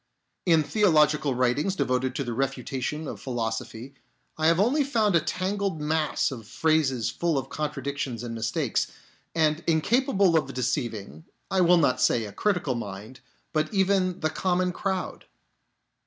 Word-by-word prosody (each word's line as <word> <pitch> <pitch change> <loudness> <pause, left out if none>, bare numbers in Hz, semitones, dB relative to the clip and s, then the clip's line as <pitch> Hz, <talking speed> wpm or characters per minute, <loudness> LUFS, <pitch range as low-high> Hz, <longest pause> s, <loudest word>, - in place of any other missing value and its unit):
In 165 -3 +5
theological 150 - +3
writings 130 +10 +1
devoted 130 -5 0
to 140 - -1
the 120 -2 -4
refutation 135 +3 -3
of - - -7
philosophy 115 +1 -4 0.4
I 155 0 +1
have 165 +1 +4
only 260 +9 +3
found 220 -8 +1
a - - +6
tangled 190 +2 -2
mass 155 0 0
of 115 -5 -8
phrases 150 -7 +1
full 170 -4 0
of 135 0 -3
contradictions 140 -4 -3
and 120 -1 -5
mistakes, 115 0 -1 0.5
and 155 0 +2
incapable 195 - +3
of 145 -5 0
deceiving, 115 - -3 0.3
I 190 - +3
will 175 0 +6
not 130 -6 +2
say 115 -2 +3
a 105 - -7
critical 180 -10 0
mind, 110 +2 -7 0.3
but 155 -1 0
even 190 -2 +1
the 155 -1 0
common 180 0 0
crowd. 190 +1 -3
150 Hz, 145 wpm, -26 LUFS, 125-180 Hz, 0.5 s, a